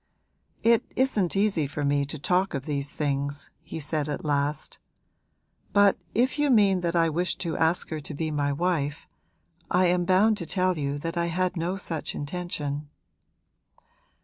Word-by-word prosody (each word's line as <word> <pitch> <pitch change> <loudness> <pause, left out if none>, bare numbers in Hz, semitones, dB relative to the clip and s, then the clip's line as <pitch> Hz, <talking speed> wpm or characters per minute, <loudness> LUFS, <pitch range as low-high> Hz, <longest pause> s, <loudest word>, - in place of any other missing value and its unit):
'It 230 0 +5
isn't 215 -10 +1
easy 195 -7 +2
for 145 +1 -3
me 140 0 +2
to 155 +3 -6
talk 180 +4 +1
of 135 0 -4
these 140 -2 -2
things,' 140 -1 -2
he - - -7
said 150 0 -1
at 145 - -4
last; 145 0 -1 0.9
'but 200 0 +5 0.2
if 255 +5 +2
you 295 -1 +3
mean 200 -6 +4
that 170 0 -1
I 165 -1 +4
wished 175 +3 -1
to 165 -3 -2
ask 165 +2 +1
her 155 - -3
to 150 +1 -8
be 155 +1 -2
my 145 -1 0
wife 150 -2 -1 0.6
I 180 +1 +3
am 175 0 +2
bound 200 +4 +4
to 170 - -5
tell 185 +1 +2
you 140 -2 -2
that 165 +3 -4
I 170 0 +1
had 180 +2 0
no 175 +3 -1
such 165 -6 -4
intention.' 145 -2 -4
165 Hz, 170 wpm, -26 LUFS, 145-185 Hz, 0.9 s, It